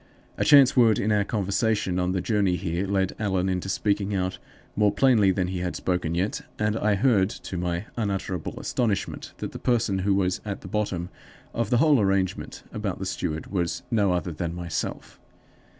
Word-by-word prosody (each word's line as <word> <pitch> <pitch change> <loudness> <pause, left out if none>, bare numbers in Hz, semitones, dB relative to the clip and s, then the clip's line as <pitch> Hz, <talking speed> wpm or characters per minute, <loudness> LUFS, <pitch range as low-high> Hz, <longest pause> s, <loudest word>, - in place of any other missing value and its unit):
A - - 0
chance 140 -2 +7
word 115 -4 +5
in 110 - 0
our 105 -1 +3
conversation 100 -2 0
on 90 0 0
the 95 -1 -1
journey 100 -4 +1
here 90 +1 -2
led 95 -1 0
Allan 95 -3 0
into 95 0 -2
speaking 100 0 0
out 95 -1 -2 0.4
more 105 -1 +3
plainly 120 -7 +4
than 95 -1 0
he 95 -1 -3
had 90 0 -3
spoken 90 -3 -1
yet, 105 +12 -1 0.2
and 105 0 0
I 105 -2 +2
heard 100 -3 +3
to 95 - -7
my 90 +2 -2
unutterable 95 -6 -3
astonishment 115 -6 -2
that - - -5
the - - -8
person 110 -6 +1
who 95 +1 +2
was 95 -2 0
at 100 -2 -5
the - - -9
bottom 90 -3 -2 0.4
of 115 -3 -1
the 120 - +3
whole 145 -2 +5
arrangement 95 -2 -1
about - - -3
the - - -5
steward 80 +3 -3
was 85 -4 -1
no 105 -5 +3
other 90 0 -1
than 85 +2 -4
myself! 85 -1 -5
95 Hz, 185 wpm, -25 LUFS, 90-105 Hz, 0.4 s, chance